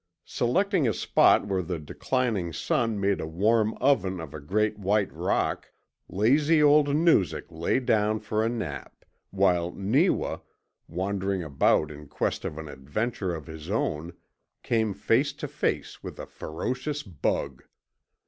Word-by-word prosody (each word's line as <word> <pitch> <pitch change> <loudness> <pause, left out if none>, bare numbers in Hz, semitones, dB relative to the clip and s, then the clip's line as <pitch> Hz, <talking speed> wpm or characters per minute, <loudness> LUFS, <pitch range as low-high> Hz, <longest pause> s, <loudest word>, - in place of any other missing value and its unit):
Selecting 180 - +1
a 110 - 0
spot - - +4
where 95 -2 0
the 90 0 -3
declining 100 - -1
sun 115 +6 0
made 100 0 +1
a - - -4
warm 105 +6 +2
oven 110 -9 +1
of 80 -4 -8
a 75 - -6
great 105 +8 0
white 100 +1 +1
rock, - - -1 0.4
lazy 145 - +3
old 150 0 +5
Noozak 155 - +3
lay 85 +9 0
down 110 -3 +1
for 110 0 -1
a 115 - +1
nap, 85 - -6 0.2
while 85 -1 +2
Neewa, 130 - +1 0.5
wandering 95 +1 -2
about 75 0 +2
in 75 0 -11
quest - - -2
of 75 - -4
an 80 -1 -6
adventure 90 - -3
of 80 -3 -8
his 80 +2 -9
own, 85 -5 -2 0.5
came 110 -4 0
face - - +1
to - - -6
face - - -2
with - - -8
a - - -6
ferocious 130 - -4
bug. 70 - -2
100 Hz, 145 wpm, -27 LUFS, 85-120 Hz, 0.5 s, old